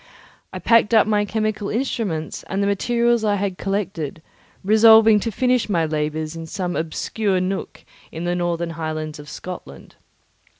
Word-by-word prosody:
I - - -6
packed 230 -1 +3
up 220 - +6
my 210 -1 +1
chemical 215 -1 -2
instruments 210 - -2
and 195 +1 -1
the - - +1
materials 235 +3 +1
I 210 -1 +2
had 195 -2 -3
collected, 185 -6 -3 0.4
resolving 220 +1 +6
to 225 +3 -3
finish 250 +1 +1
my 170 -5 +1
labours 155 +1 -2
in 165 0 -7
some 180 +1 -3
obscure 190 +5 -1
nook 185 +1 -4 0.3
in 165 - -6
the 175 0 0
northern 175 -1 -1
highlands 155 -1 -5
of 150 0 -11
Scotland. 180 +3 -9
195 Hz, 155 wpm, -21 LUFS, 165-220 Hz, 0.4 s, up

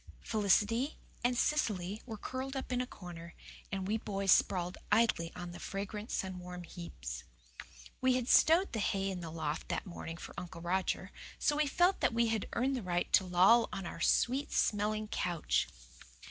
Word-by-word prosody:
Felicity 220 +6 +2 0.3
and 245 0 +2
Cecily 210 -9 0
were 220 -2 -5
curled 260 +5 -4
up 265 -1 -4
in 250 0 +1
a 250 - -3
corner, 175 -4 -10 0.4
and 190 -1 -2
we 220 +2 0
boys 195 -3 0
sprawled 180 -1 +3
idly 210 -7 +3
on 175 -1 -6
the 175 - -9
fragrant, 205 +2 -5
sun 185 -1 -2
warm 180 0 -7
heaps. 65 - -7 0.8
We 260 -1 +4
had 250 -1 -1
"stowed" 335 +6 +5
the 220 - -1
hay 195 -1 0
in 185 - -4
the 170 -2 -6
loft 155 -2 -3
that - - -2
morning 170 -2 -7
for - - -9
Uncle 175 -1 -8
Roger, 185 +2 -1 0.3
so 295 - +2
we 300 0 +2
felt 355 +6 +3
that - - +1
we 235 0 +3
had 220 -2 -1
earned 265 +3 +1
the 250 - -2
right 175 -2 -1
to - - +7
loll 190 +6 +5
on 195 - -4
our 165 - -6
sweet 265 +10 +2
smelling 215 +1 +1
couch. 175 -5 0
200 Hz, 180 wpm, -33 LUFS, 180-240 Hz, 0.8 s, to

